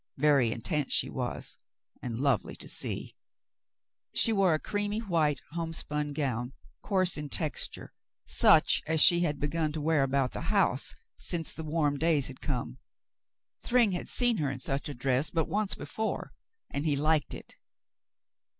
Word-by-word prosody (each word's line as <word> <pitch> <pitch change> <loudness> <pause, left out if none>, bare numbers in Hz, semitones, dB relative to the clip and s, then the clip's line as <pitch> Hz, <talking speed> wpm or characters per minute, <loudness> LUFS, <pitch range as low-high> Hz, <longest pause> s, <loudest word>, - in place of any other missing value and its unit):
Very 140 -5 +3
intent 140 +4 -2
she - - +2
was, - - -4 0.4
and 115 -2 -4
lovely 135 -8 0
to - - -7
see. - - -4 1.0
She 225 - +4
wore 190 -5 +3
a - - -2
creamy 205 +3 -2
white 165 -9 0
homespun 155 -3 -2
gown, 130 -4 -2 0.3
coarse 185 -5 +2
in 150 -1 -6
texture, 155 +1 -1 0.3
such - - +5
as 160 0 +1
she 175 +3 +7
had 150 -5 -1
begun 155 +1 -1
to 155 - -3
wear 155 0 +2
about 135 -1 +1
the - - -6
house - - +1 0.2
since 165 -3 0
the 160 - -6
warm 150 -2 0
days 160 -4 +2
had 130 - -8
come. 125 - -4 0.8
Thryng 240 -4 +3
had 180 - -4
seen 245 -2 +2
her 145 -5 0
in 135 -1 -5
such 135 +3 -3
a 145 - -6
dress 130 +3 +1
but 165 -2 -1
once 210 0 -1
before, 220 0 -4 0.4
and 140 - -2
he 145 - +2
liked 150 -1 +1
it. - - -12
150 Hz, 160 wpm, -29 LUFS, 140-170 Hz, 1.0 s, she